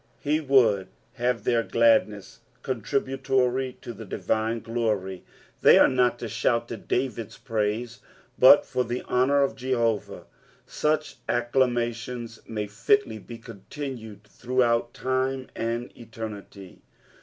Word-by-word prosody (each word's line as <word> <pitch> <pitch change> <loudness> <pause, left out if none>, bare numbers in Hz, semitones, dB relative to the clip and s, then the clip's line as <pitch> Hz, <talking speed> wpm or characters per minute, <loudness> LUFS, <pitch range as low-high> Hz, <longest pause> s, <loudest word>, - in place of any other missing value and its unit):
''' - - -37
He 150 +1 0
would 120 -10 +3 0.3
have 120 -3 -1
tlieir 115 0 +1
gladness 110 -3 +2 0.2
con 130 -4 -3
tributory 130 0 0
to 120 - -7
the 110 +1 -9
divine 110 +2 -1
glory; 105 -5 -2 0.4
they - - +7
are - - +7
not 125 -2 +2
to 120 - -5
shout 115 +2 0
to 115 - -5
David's 120 -4 -3
praise, 115 +1 -2 0.4
but 130 +3 +8
for 125 -1 -1
the 120 +1 -4
honour 140 +3 +2
of 140 - -1
Jehovah. 120 -4 -1 0.4
Such 155 0 -1
acclamations 120 -1 -1
may 105 -2 -3
fitly 110 - +1
be 115 +3 -10
continued 115 -1 -8
throughout 120 +1 0
time 130 0 -1
and 115 +2 -3
eternity. 110 -4 -9
120 Hz, 125 wpm, -26 LUFS, 110-130 Hz, 0.4 s, but